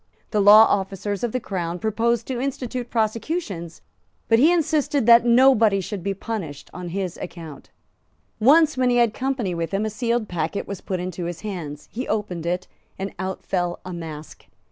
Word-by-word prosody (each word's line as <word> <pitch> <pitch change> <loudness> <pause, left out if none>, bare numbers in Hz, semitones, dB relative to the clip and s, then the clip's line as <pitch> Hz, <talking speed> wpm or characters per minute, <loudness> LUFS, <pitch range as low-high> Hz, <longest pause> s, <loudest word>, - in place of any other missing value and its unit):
The 210 - +2
law 210 +2 +9
officers 195 +1 -2
of 240 - 0
the 255 - -1
Crown 175 -6 -4
proposed 230 +4 0
to 255 -2 -3
institute 250 -2 -4
prosecutions; 220 - -3 0.5
but 225 0 +5
he 310 +7 +6
insisted 300 -6 +1
that 235 +1 +7
nobody 235 -4 +5
should 195 +1 -5
be 195 +2 -2
punished 185 -9 -6
on 180 -1 -6
his 185 -1 -3
account. 165 -5 -9 0.7
Once, 305 +6 +5
when 255 -1 +2
he 245 - +2
had 235 -2 +3
company 255 -8 -2
with 170 -1 -3
him, 200 +2 0
a 215 - -2
sealed 235 0 -1
packet 175 +2 -3
was 200 -2 -6
put 185 -2 -3
into 180 -1 -4
his 170 -1 -5
hands; 170 -9 -6
he 250 +4 -5
opened 185 -6 -2
it; 180 +1 -1 0.3
and 195 +1 -5
out 190 0 -4
fell 175 -2 -1
a 185 - -6
mask. 160 -3 -9
205 Hz, 180 wpm, -23 LUFS, 180-240 Hz, 0.7 s, law